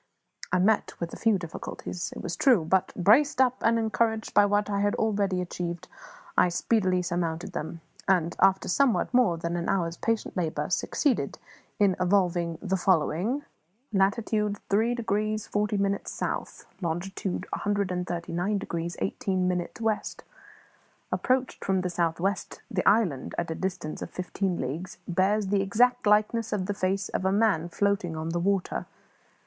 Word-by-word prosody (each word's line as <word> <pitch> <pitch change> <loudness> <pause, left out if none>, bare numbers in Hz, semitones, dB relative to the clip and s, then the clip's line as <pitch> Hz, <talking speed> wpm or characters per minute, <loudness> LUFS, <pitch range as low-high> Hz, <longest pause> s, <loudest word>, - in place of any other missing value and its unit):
I - - +3
met 205 +4 +2
with 170 -1 -4
a - - -4
few 225 -3 +2
difficulties, 170 0 -6
it - - -7
was 175 - -3
true; 240 - +4
but, 190 +3 +2
braced 250 - +4
up 255 -1 +4
and 230 0 +3
encouraged 220 0 0
by 205 0 +6
what 205 0 +1
I 200 -1 -1
had 205 0 +1
already 200 -4 +1
achieved, 175 -1 -4 0.5
I - - +5
speedily 185 -1 +1
surmounted 175 +1 -2
them, 160 +2 -5 0.3
and, 175 -3 +2
after 195 0 +4
somewhat 255 +5 +2
more 245 -9 +4
than 170 +1 -3
an 175 0 -2
hour's 170 -3 0
patient 225 -1 -1
labour, 170 -3 -2
succeeded 285 -5 0 0.4
in 200 -3 +3
evolving 175 -3 +1
the 190 -1 0
following: 185 - +1 0.5
"Latitude 210 +1 +1
3 225 +4 +3
degrees 215 -2 -1
40 210 0 0
minutes 200 0 -1
South; - - -4 0.2
longitude 180 +2 -3
139 180 -1 -1
degrees 170 -2 -4
18 190 -4 -1
minutes 180 +2 -2
West. 220 -2 -2 0.9
Approached 255 0 0
from 190 -1 +1
the 180 -1 -2
south 170 -1 0
west 195 +1 -2
the 185 -3 0
island, 190 - +1
at 170 -1 -2
a - - 0
distance 180 -3 -4
of - - -5
fifteen 185 0 -2
leagues, 170 +10 -4
bears 195 +3 +1
the 200 -1 +2
exact 240 +4 +2
likeness 215 +2 +3
of 195 -3 -1
the 205 - -1
face 195 0 -1
of - - -2
a 190 - +2
man 195 -5 +2
floating 195 -3 0
on 160 +1 -3
the 170 +1 -1
water. 195 +1 0
195 Hz, 155 wpm, -27 LUFS, 175-210 Hz, 0.9 s, by